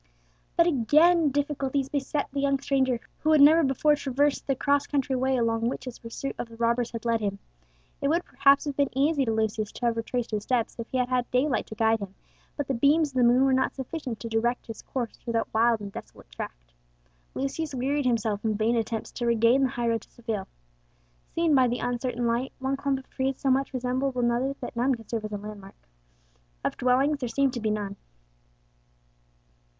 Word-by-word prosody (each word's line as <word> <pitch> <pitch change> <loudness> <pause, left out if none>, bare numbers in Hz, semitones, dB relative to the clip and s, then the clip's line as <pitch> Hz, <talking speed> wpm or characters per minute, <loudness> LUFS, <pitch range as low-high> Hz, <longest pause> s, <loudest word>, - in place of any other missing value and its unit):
But 335 - +6
again 315 +3 +4
difficulties 280 -1 -1
beset 285 +1 -2
the 280 - -1
young 275 0 +2
stranger, 265 -3 +1 0.2
who 310 +1 +2
had 305 - +5
never 315 +4 +7
before 290 +2 +3
traversed 285 +1 0
the 270 - +1
cross 280 +2 +1
country 275 -2 0
way 260 +1 +1
along 230 -1 +1
which 255 - -6
his 250 -2 -7
pursuit 230 +4 -5
of 235 - -4
the 230 - -12
robbers 235 +1 +1
had 230 0 -7
led 230 -1 +1
him. 200 -1 -2 0.6
It - - +1
would 335 +4 +1
perhaps 275 +1 +4
have 290 -2 -3
been 280 -1 +2
easy 285 0 +2
to 225 - 0
Lucius 220 -1 -1
to 245 - -4
have 230 -1 +1
retraced 235 +1 -2
his 210 -1 -1
steps 235 +1 -1
if 230 - -5
he 260 - -2
had 250 0 0
had 250 -1 0
daylight 255 +1 +1
to 220 - -8
guide 225 +1 +2
him, 195 -1 -7 0.4
but 290 -3 -2
the 270 - 0
beams 290 +5 +3
of - - -20
the 250 - +4
moon 245 +2 +5
were 270 - +3
not 260 0 +1
sufficient 265 -3 -5
to 230 - -4
direct 230 +2 0
his 225 -2 -8
course 245 -4 -4
through 235 - -6
that 225 -1 -1
wild 230 0 +3
and 200 -1 -6
desolate - - -11
tract. - - -8 0.6
Lucius 275 +2 -3
wearied 270 +2 0
himself 220 -4 0
in 220 -1 0
vain 225 +2 +2
attempts 225 -1 -2
to 240 - -3
regain 235 +3 +4
the 265 - +3
highroad 235 -2 -1
to - - -18
Seville. 220 -5 -5 0.9
Seen 330 -2 +2
by 260 -2 +5
the 245 +1 -1
uncertain 245 0 -2
light, 235 +3 0
one 265 +1 -1
clump 275 0 -1
of 265 - -11
trees 265 0 -1
so 270 - +1
much 270 +1 +1
resembled 255 +1 -1
another 245 +2 +1
that - - -6
none 250 +3 +2
could 225 -2 -14
serve 225 -2 -2
as 215 - -6
a 205 - -3
landmark. 205 -1 -10 0.9
Of - - 0
dwellings 270 +4 +2
there 250 -3 -3
seemed 275 +1 +1
to 240 - -3
be 220 -1 -1
none. 205 -2 -3
250 Hz, 210 wpm, -27 LUFS, 230-275 Hz, 0.9 s, never